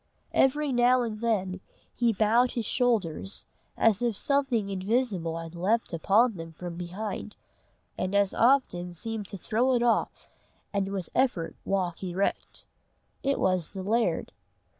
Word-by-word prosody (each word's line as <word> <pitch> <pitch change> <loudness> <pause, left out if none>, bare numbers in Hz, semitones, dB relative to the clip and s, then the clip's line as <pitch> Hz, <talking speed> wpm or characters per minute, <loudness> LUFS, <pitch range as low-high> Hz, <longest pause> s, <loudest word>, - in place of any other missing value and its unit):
Every 290 +2 +3
now 245 0 +4
and 215 -2 -4
then 190 -5 0 0.3
he 240 -1 +2
bowed 225 +4 +3
his 235 -3 -2
shoulders, 205 -7 0 0.3
as 220 -2 +3
if 235 -4 0
something 270 -7 +1
invisible 190 -4 0
had 165 0 -7
leaped 195 +5 0
upon 205 +6 +3
them 165 0 -8
from 175 +1 -7
behind, 190 +4 -5 0.6
and 185 +2 -1
as 200 -1 +3
often 230 -9 +2
seemed 220 +3 -4
to 195 - -7
throw 240 +8 +1
it 240 - +2
off 235 -1 0 0.5
and 200 -1 0
with 190 -3 -4
effort 200 -11 0
walk 185 -3 -1
erect. 185 +2 -2 0.6
It 275 0 0
was 185 -4 +1
the 190 -2 -6
laird. 225 +4 0
210 Hz, 140 wpm, -28 LUFS, 185-240 Hz, 0.6 s, now